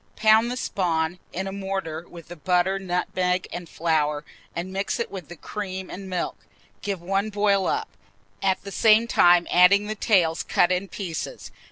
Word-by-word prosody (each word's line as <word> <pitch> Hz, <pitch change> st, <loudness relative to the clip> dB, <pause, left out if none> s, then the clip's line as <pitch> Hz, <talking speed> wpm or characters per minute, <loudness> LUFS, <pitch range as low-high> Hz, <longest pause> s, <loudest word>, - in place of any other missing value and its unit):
Pound 220 Hz, +2 st, +5 dB
the 250 Hz, -, -3 dB
spawn 175 Hz, -6 st, -1 dB
in 190 Hz, +2 st, -3 dB
a 195 Hz, -, -4 dB
mortar, 190 Hz, -4 st, -4 dB
with 170 Hz, -2 st, -12 dB
the 175 Hz, -, -7 dB
butter, 180 Hz, +3 st, +1 dB
nutmeg, 180 Hz, 0 st, -1 dB
and 175 Hz, -2 st, -6 dB
flour, 150 Hz, -3 st, 0 dB, 0.3 s
and 180 Hz, +2 st, -4 dB
mix 195 Hz, +4 st, -2 dB
with 190 Hz, -4 st, -7 dB
it -, -, -29 dB
the 175 Hz, -, -8 dB
cream 190 Hz, +1 st, -6 dB
and 190 Hz, 0 st, -7 dB
milk. 180 Hz, -1 st, -2 dB, 0.4 s
Give 200 Hz, -2 st, -3 dB
one 195 Hz, +3 st, 0 dB
boil 200 Hz, -2 st, +2 dB
up, -, -, -1 dB, 0.5 s
at 190 Hz, -1 st, +1 dB
the 200 Hz, -, -7 dB
same 220 Hz, +2 st, +5 dB
time 175 Hz, -6 st, +5 dB
adding 190 Hz, +3 st, +6 dB
the 215 Hz, -, -3 dB
tails 185 Hz, -7 st, +2 dB
cut 175 Hz, -, +2 dB
in 185 Hz, +2 st, 0 dB
pieces. 175 Hz, -3 st, -6 dB
185 Hz, 175 wpm, -24 LUFS, 175-200 Hz, 0.5 s, adding